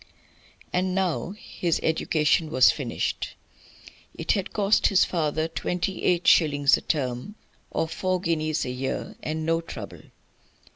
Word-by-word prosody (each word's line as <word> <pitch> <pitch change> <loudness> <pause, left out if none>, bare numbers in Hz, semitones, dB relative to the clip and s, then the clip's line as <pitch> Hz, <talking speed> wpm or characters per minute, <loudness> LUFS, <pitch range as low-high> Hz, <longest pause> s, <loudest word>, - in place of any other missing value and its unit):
And 185 +1 0
now 190 0 -1
his 175 -5 -2
education 160 0 +1
was 130 -5 +6
finished. - - -3 0.8
It - - -1
had 195 -3 -1
cost 205 0 +3
his 195 - +4
father 155 -2 -1
twenty 180 +3 -3
eight 175 -1 +1
shillings 145 -3 +5
a - - -5
term, 135 - -2 0.3
or 160 - -1
four 185 +2 -1
guineas 155 -3 -1
a 125 - -3
year, 130 +1 -4
and 155 +1 -3
no 165 +1 +1
trouble. 165 - -8
165 Hz, 135 wpm, -25 LUFS, 155-180 Hz, 0.8 s, was